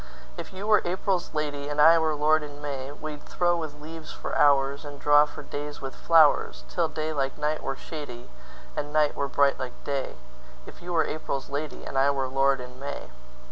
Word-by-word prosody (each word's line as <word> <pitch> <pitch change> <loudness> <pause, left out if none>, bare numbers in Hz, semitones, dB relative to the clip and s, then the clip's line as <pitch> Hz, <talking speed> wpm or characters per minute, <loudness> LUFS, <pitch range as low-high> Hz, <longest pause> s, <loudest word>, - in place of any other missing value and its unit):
If - - -7
you 190 +2 -6
were 215 0 +5
April's 185 +1 -1
lady, 145 -1 -2
And 145 0 -3
I 165 +2 +8
were 160 -1 +1
lord 155 +1 +3
in 145 -1 -8
May, 140 -2 -5
We'd 150 0 -7
throw 175 -1 +1
with 155 -3 -6
leaves 160 +1 -9
for - - -6
hoursAnd 140 +1 +2
draw 145 +1 +5
for - - -9
days 145 0 -6
with 135 -1 -6
flowers, 150 - +4
Till - - +1
day 155 0 -3
like 135 -2 -1
night 150 +1 -1
were 135 - -3
shadyAnd - - -8
night 150 -1 +2
were 140 - -1
bright 140 0 +2
like 130 -2 -7
day; 140 -2 -3 0.5
If - - -13
you 175 +1 -6
were 165 -2 +3
April's 140 -3 -4
lady, 145 +1 -4
And 135 - -1
I 135 +1 +4
were 135 -2 0
lord 135 +1 +2
in 125 0 -9
May. 140 - -6
145 Hz, 195 wpm, -27 LUFS, 135-155 Hz, 0.5 s, I